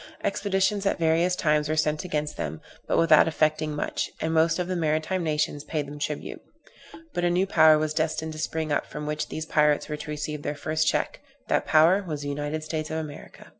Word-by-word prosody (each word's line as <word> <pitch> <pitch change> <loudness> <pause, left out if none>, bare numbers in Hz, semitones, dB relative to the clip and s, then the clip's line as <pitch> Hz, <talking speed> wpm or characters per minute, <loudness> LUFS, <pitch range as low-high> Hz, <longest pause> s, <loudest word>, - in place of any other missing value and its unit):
Expeditions 195 0 0
at - - +1
various 170 +2 +2
times 150 -2 +1
were 155 - +1
sent 155 +1 0
against 150 -4 -2
them, 75 +1 -4 0.3
but - - +1
without 165 - +6
effecting 155 -1 0
much; 150 - -2
and 160 +1 -1
most 165 +1 +3
of 180 -1 -2
the 185 - -2
maritime 160 +2 0
nations 150 -2 -1
paid 150 -1 -3
them 145 +1 -9
tribute. 150 0 -4 0.7
But 175 - -2
a 175 - +3
new 180 +2 +2
power 160 -4 +6
was 155 0 -1
destined 160 0 -1
to 155 - -8
spring 160 0 -2
up, 145 - 0
from 150 0 -6
which 150 0 -2
these 155 - -4
pirates 150 -2 +2
were 150 - -3
to 150 - -8
receive 150 0 -4
their 145 - -3
first 155 +2 -1
check; - - 0 0.3
that - - +1
power 165 +5 +5
was 155 -6 -5
the 145 - -3
United 145 +2 -3
States 155 0 -4
of 160 - -3
America. 155 -2 -8
155 Hz, 210 wpm, -26 LUFS, 150-165 Hz, 0.7 s, without